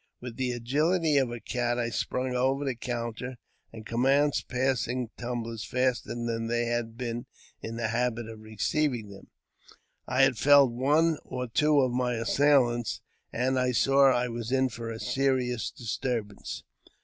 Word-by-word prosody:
With 120 -2 -8
the 125 -2 -2
agiUty 150 +4 +2
of 130 - -1
a 120 0 -5
cat 120 +1 -1
I 120 -1 -1
sprung 125 +3 -2
over 135 +3 +1
the 135 - 0
counter, 120 +1 -5 0.3
and 110 -1 -10
commenced 135 +5 +2
passing 125 -2 -1
tumblers 115 -2 -4
faster 125 -1 -1
than 115 -1 -2
they 120 +1 0
had 120 -1 -2
been 120 -1 -4 0.3
in 115 - -6
the 115 -1 -2
habit 120 0 -1
of 110 -1 -9
receiving 110 +2 -1
them. 100 -1 -12 0.8
I 130 +2 +3
had 135 -4 +3
felled 140 -3 +6
one 150 +6 +2
or 125 0 -4
two 150 +5 +3
of 130 -2 +1
my 125 0 0
assailants, 120 -1 +2 0.3
and 130 +2 0
I 125 0 +1
saw 135 +3 +5
I 125 -1 +2
was 120 0 -5
in 130 0 +2
for 115 -1 -6
a 115 0 -6
serious 125 -1 0
disturbance. 115 -3 -4
125 Hz, 160 wpm, -28 LUFS, 115-130 Hz, 0.8 s, felled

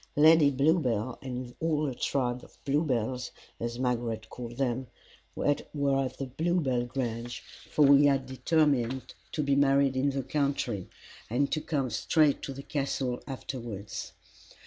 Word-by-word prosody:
Lady 155 0 +7
Bluebell 130 -5 +1
and 125 -1 -5
all 155 -2 +1
the 135 - -2
tribe 125 -1 -1
of - - -17
Bluebells, 130 -4 0 0.3
as 120 0 -3
Margaret 120 -3 -2
called 120 -1 -7
them, 130 -1 -1 0.5
were - - -3
at 145 - -1 0.7
Bluebell 155 -8 +1
Grange, 120 -2 -4 0.3
for 150 - +3
we 140 +1 +7
had 135 -2 +3
determined 130 -2 +1 0.2
to 150 - -1
be 140 -1 +2
married 140 -1 +4
in 135 +2 +2
the 135 -1 -2
country, 135 -8 -1 0.4
and 135 +5 +1
to 155 - 0
come 140 -7 -1
straight 150 +5 +3
to - - -5
the 135 +1 -7
Castle 135 -4 -2
afterwards. 120 -6 -6
135 Hz, 140 wpm, -29 LUFS, 120-145 Hz, 0.7 s, Lady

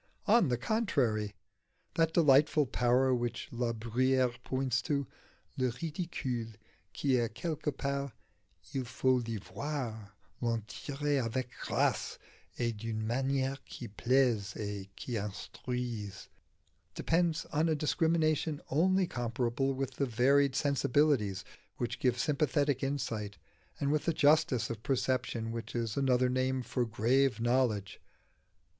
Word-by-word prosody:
On 215 -3 +5
the 125 -2 +1
contrary. 120 - 0 0.6
That 165 -1 +2
delightful 150 -2 +5
power 125 +1 +2
which 120 -1 -2
La 120 -1 -1
Bruyère 125 +3 +1
points 130 -1 0
to 140 0 -1 0.5
"le 130 -1 +2
ridicule 135 - -3 0.4
qui 135 -3 +1
est 115 -2 -1
quelque 155 +1 -2
part, 140 -1 -2 0.6
il 135 - -1
faut 130 +1 +2
l'y 115 -1 -3
voir, 110 -4 -5 0.3
l'en 115 -2 0
tirer 145 +6 -2
avec 125 +1 -2
grâce - - 0 0.4
et 120 -1 0
d'une 110 0 -4
manière 135 +3 0
qui 120 - -8
plaise 115 -2 +1
et 100 -2 -5
qui 120 -3 -3
instruise" 105 +1 -5 0.7
depends 165 -1 +1
on 155 +2 +2
a 160 - +2
discrimination 155 0 +1
only 185 +6 +3
compatible 120 0 -1
with 135 0 -3
the 140 - +1
varied 135 +4 +3
sensibilities 140 -8 +2 0.3
which 120 - -3
give 125 -2 +2
sympathetic 145 -1 +1
insight, 115 -7 -2 0.4
and 140 0 +1
with 150 0 +1
the 165 - +2
justice 150 -6 +3
of 110 -2 -6
perception 125 -3 -1
which 115 +1 -6
is 115 -2 -1
another 130 -2 +3
name 130 0 0
for 125 0 -1
grave 120 +4 +2
knowledge. 120 -4 +1
130 Hz, 125 wpm, -32 LUFS, 115-140 Hz, 0.7 s, On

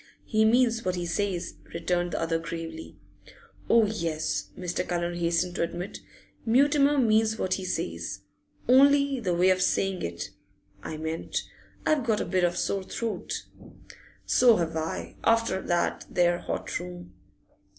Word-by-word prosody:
'He 220 -1 +2
means 230 0 +3
what 185 0 0
he 175 -1 -3
says,' 180 +1 -2 0.2
returned 175 0 -1
the - - -1
other 165 0 0
gravely. 165 - -7 0.7
'Oh 230 -1 +6
yes,' 155 - -2
Mr. 180 0 -2
Cullen 175 0 -1
hastened 175 +1 0
to - - 0
admit. 175 +3 -3 0.4
'Mutimer 280 +4 +4
means 220 -3 +3
what 185 - 0
he 190 - -3
says! 85 - -3 0.5
Only 280 +1 +5
the 185 -7 0
way 180 +2 +4
of 185 0 +1
saying 195 -1 +1
it, 85 0 -4 0.5
I 155 - -6
meant 160 +1 -3 0.4
I've 305 -4 +2
got 220 -2 +1
a - - -1
bit 185 -1 0
of 175 0 +3
a - - -5
sore 195 - 0
throat.' 225 +4 -4 0.8
'So 245 -3 +5
have 165 -3 -1
I. 160 0 -4
After 230 -4 +2
that 175 0 -1
there 175 -1 +2
hot - - -3
room. 175 0 -9
180 Hz, 150 wpm, -27 LUFS, 170-225 Hz, 0.8 s, Oh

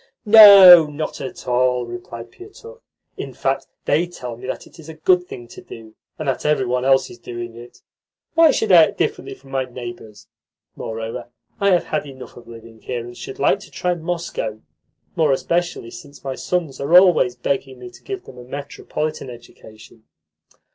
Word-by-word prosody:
"No, 200 -6 +10
not 150 0 -6
at 130 - -8
all," 125 0 +1
replied 120 0 -9
Pietukh. 455 +5 -14 0.4
"In - - -7
fact, - - -2 0.2
they 175 +2 +1
tell 125 -9 -8
me 120 - -11
that - - -5
it - - -19
is 160 0 -12
a 160 - -9
good 180 +3 +1
thing 120 -1 -10
to - - -12
do, 110 -1 -13 0.2
and 155 - -6
that 135 - -2
every 150 -3 +1
one 125 +1 -1
else 135 0 +2
is - - -14
doing 120 -1 -8
it. 120 +1 -14 0.5
Why 330 -1 +5
should 220 -7 0
I 170 -3 +8
act - - -10
differently - - -3
from 135 0 -19
my 135 -1 -1
neighbours? 120 -4 -10 0.5
Moreover, 115 +1 -6 0.3
I 200 - +2
have 180 -2 +3
had 150 -1 -3
enough 130 -2 -12
of 120 - -15
living 115 -1 -13
here, 120 -2 -5
and 120 0 -11
should 130 - -9
like 135 - +2
to - - -14
try 180 0 -2
Moscow 165 -10 -5 0.5
more 155 -3 +2
especially 170 -4 -2
since 145 0 -13
my 135 -1 -4
sons 160 -1 -3
are 160 +6 +5
always 175 -9 +4
begging 135 +1 -3
me 125 -1 -11
to - - -17
give 390 -2 -6
them 125 - -13
a - - -10
metropolitan 145 +2 -6
education." 110 -2 -15
135 Hz, 185 wpm, -20 LUFS, 120-170 Hz, 0.5 s, No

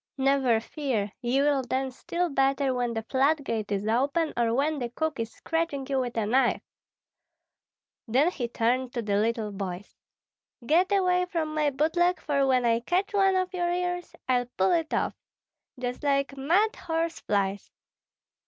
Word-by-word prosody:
"Never 265 -4 +3
fear, 230 -5 -2
ye 260 +3 +1
will 285 -2 +2
dance 260 0 -2
still 350 +5 -2
better 270 -1 +1
when 245 -2 -1
the 225 - -2
floodgate 260 -4 0
is 200 +1 -1
open, 280 +8 +1
or 235 -1 +1
when 290 +5 +1
the 240 -2 -3
cook 315 +3 -3
is 225 0 -3
scratching 325 -4 -2
you 270 -1 0
with 245 -2 -3
a 220 - +1
knife." 250 +3 +2 1.4
Then 270 +10 +3
he 245 -8 -3
turned 245 +2 0
to 235 - -1
the 200 -1 0
little 220 0 0
boys: 195 -1 -6 0.7
"Get 345 +8 +3
away 365 -2 +3
from 320 -3 -2
my 305 -1 +2
boot 300 +5 0
leg, 355 +1 +3
for 280 -2 +1
when 255 -2 +3
I 230 0 +3
catch 360 - -1
one 390 -1 +3
of 370 0 0
your 350 -1 0
ears, 355 0 -2
I'll 245 -1 +1
pull 190 0 +3
it 325 -2 +1
off. - - 0 0.7
Just 245 0 -4
like 275 -1 0
mad 350 +11 +2
horse 330 0 -2
flies! 200 -1 -1
270 Hz, 170 wpm, -27 LUFS, 235-325 Hz, 1.4 s, Never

